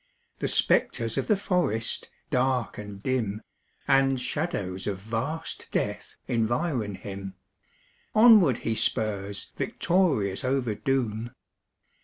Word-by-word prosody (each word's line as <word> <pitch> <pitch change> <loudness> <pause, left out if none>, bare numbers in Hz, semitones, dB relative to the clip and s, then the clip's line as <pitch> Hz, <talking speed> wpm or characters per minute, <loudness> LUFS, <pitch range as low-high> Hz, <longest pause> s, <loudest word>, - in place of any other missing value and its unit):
The - - -1
spectres 115 -1 +2
of - - -1
the 210 - +3
forest, 175 - 0 0.2
dark 125 -3 +1
and 100 -1 -8
dim, 115 -5 -1 0.4
And 135 -1 +4
shadows 105 - -3
of 100 -2 -1
vast 115 +11 -4
death - - -2
environ 120 - 0
him 95 0 -7 0.8
Onward 215 - +7
he 115 - +1
spurs 100 -3 -1
victorious 140 - +1
over 130 -3 0
doom. 120 -1 -1
115 Hz, 105 wpm, -27 LUFS, 105-135 Hz, 0.8 s, Onward